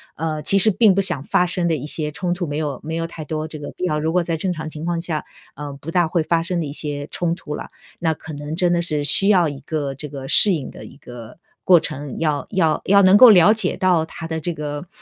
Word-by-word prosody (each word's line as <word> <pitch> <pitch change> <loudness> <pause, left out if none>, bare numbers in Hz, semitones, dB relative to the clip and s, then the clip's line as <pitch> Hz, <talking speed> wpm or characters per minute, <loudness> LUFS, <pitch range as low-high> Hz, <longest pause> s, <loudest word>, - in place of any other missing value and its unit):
呃， 155 -1 -3
其 200 - +2
实 220 - +5
并 210 0 +4
不 195 - +1
想 145 -8 +5
发 180 - +1
生 175 0 -1
的 165 - +1
一 145 0 -6
些 150 -1 -3
冲 175 +2 -3
突 175 -1 -4
没 145 - -5
有 145 -4 -3
没 160 +1 -5
有 165 0 -3
太 160 -1 -9
多 155 +1 -4
这 155 - -9
个 145 -1 -8
必 - - -9
要， 150 -3 -1
如 160 +1 -2
果 180 - +2
在 165 -1 -3
正 180 +2 -2
常 160 -1 -6
情 155 +1 -8
况 170 -1 -2
下， 165 -3 -3 0.3
呃， 145 0 -7
不 140 +3 -10
大 175 0 +1
会 170 0 0
发 165 +1 0
生 175 0 -2
的 160 - -2
一 140 - -6
些 145 -2 -4
冲 170 -1 -2
突 150 -4 -7
啦。 - - -8 0.3
那 165 -2 0
可 155 0 -11
能 145 +2 -6
真 175 0 +1
的 175 - +1
是 150 -3 -2
需 195 +6 +4
要 180 -5 +4
一 140 -1 -8
个 145 -4 -4
这 150 +2 -7
个 135 -2 -8
适 205 - +6
应 145 -6 -4
的 - - -12
一 - - -14
个 120 -2 -12 0.3
过 180 -2 +6
程。 145 -4 -6
要 150 -3 -1
要 170 -6 +1
要 200 +1 +5
能 185 +1 +6
够 250 +2 +9
了 200 +1 +6
解 215 -5 -2
到 180 -4 +2
他 165 0 -9
的 160 -1 -4
这 175 +2 -4
个， 150 +1 -6
160 Hz, 295 characters per minute, -20 LUFS, 150-175 Hz, 0.3 s, 够